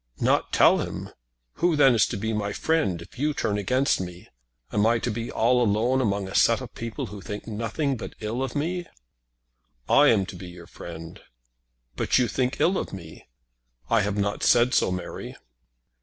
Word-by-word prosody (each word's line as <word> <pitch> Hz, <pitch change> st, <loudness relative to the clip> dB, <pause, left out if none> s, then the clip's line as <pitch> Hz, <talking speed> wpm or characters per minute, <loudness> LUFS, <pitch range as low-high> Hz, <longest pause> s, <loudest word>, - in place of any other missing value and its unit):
"Not -, -, +1 dB
tell -, -, +5 dB
him! -, -, -5 dB, 0.5 s
Who 175 Hz, -2 st, +3 dB
then 135 Hz, -3 st, +6 dB
is 110 Hz, -3 st, +4 dB
to -, -, -4 dB
be 110 Hz, +2 st, -2 dB
my 105 Hz, -1 st, -2 dB
friend 100 Hz, -, 0 dB
if 105 Hz, -, -16 dB
you 150 Hz, +1 st, 0 dB
turn 105 Hz, -1 st, -1 dB
against 130 Hz, +3 st, +1 dB
me? 90 Hz, -1 st, -8 dB, 0.4 s
Am 105 Hz, -, +2 dB
I 115 Hz, +1 st, +3 dB
to 120 Hz, +1 st, -2 dB
be 115 Hz, +2 st, -4 dB
all 125 Hz, +2 st, +3 dB
alone 120 Hz, +4 st, +2 dB
among 100 Hz, -4 st, -1 dB
a 95 Hz, -, -8 dB
set -, -, +4 dB
of -, -, -9 dB
people 115 Hz, -3 st, -5 dB
who 100 Hz, -, -8 dB
think 105 Hz, +3 st, -6 dB
nothing 115 Hz, +6 st, -2 dB
but -, -, -8 dB
ill 110 Hz, +3 st, -3 dB
of 135 Hz, -, -3 dB
me?" 175 Hz, +4 st, -2 dB, 1.0 s
"I 145 Hz, -, +6 dB
am 105 Hz, -7 st, +4 dB
to 95 Hz, -, -9 dB
be 90 Hz, +1 st, -9 dB
your 90 Hz, -1 st, -11 dB
friend." 85 Hz, -1 st, -10 dB, 0.7 s
"But -, -, +1 dB
you 125 Hz, -2 st, +3 dB
think 125 Hz, +4 st, -1 dB
ill 185 Hz, +2 st, +3 dB
of -, -, -5 dB
me." 85 Hz, -5 st, -10 dB, 0.6 s
"I 115 Hz, -2 st, +4 dB
have 105 Hz, 0 st, -1 dB
not 100 Hz, 0 st, -1 dB
said 120 Hz, +1 st, +4 dB
so, -, -, +3 dB
Mary." 90 Hz, 0 st, -6 dB
110 Hz, 190 wpm, -25 LUFS, 100-130 Hz, 1.0 s, then